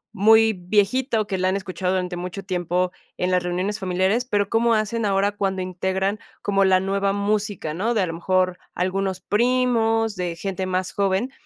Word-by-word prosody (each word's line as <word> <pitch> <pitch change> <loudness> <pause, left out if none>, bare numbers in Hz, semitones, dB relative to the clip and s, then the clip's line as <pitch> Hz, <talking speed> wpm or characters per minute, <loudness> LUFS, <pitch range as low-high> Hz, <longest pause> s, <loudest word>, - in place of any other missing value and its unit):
muy 220 +2 +5
viejito, 215 +5 +1
que 190 -2 -2
la 185 0 +2
han 190 - 0
escuchado 185 -1 -2
durante 180 -1 -2
mucho 180 +2 -6
tiempo 180 -1 -1 0.3
en 180 +1 0
las 180 0 +3
reuniones 185 +4 -2
familiares, 190 +5 +1
pero 205 -5 0
¿cómo 230 0 +3
hacen 215 +1 -1
ahora 200 +1 +2
cuando 195 -2 -1
integran 190 +3 -1 0.2
como 195 -1 +2
la 190 -1 +4
nueva 195 +1 0
música, 205 -5 -1
no? 220 +8 -1
De 215 - +2
a - - +2
lo 165 - -4
mejor 185 +1 0 0.2
algunos 185 0 -1
primos, 225 -1 +1
de 180 -2 -3
gente 190 +1 -4
más 185 0 -2
joven, 200 +5 0
195 Hz, 180 wpm, -23 LUFS, 185-215 Hz, 0.3 s, muy